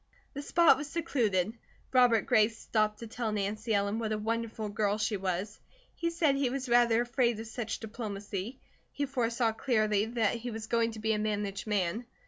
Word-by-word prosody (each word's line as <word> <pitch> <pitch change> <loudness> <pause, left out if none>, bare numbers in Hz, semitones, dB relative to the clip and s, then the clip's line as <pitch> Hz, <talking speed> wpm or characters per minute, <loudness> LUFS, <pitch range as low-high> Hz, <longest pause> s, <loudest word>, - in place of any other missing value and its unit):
The 285 - -5
spot 335 +3 +5
was 295 - -5
secluded. 225 - 0 0.4
Robert 245 -4 +5
Gray 215 -1 +5
stopped 215 -1 -1
to - - -5
tell 225 0 -3
Nancy 210 +2 -2
Ellen 200 +2 0
what 220 -1 -2
a 215 - 0
wonderful 225 0 -2
girl 205 0 0
she 220 0 0
was. 190 +2 -3 0.3
He 335 - -1
said 330 -4 +2
he 275 -2 +1
was 260 +1 -3
rather 240 -1 +4
afraid 240 -2 +1
of 225 - -6
such 225 0 -4
diplomacy. 210 0 -5 0.3
He 285 - -2
foresaw 240 -3 0
clearly 215 -3 +1
that 225 -2 0
he 240 +1 -5
was 220 -1 -5
going 230 0 +1
to 220 - -8
be 220 +1 +1
a 210 - 0
managed 210 0 -2
man. 210 +3 -1
225 Hz, 185 wpm, -30 LUFS, 210-240 Hz, 0.4 s, spot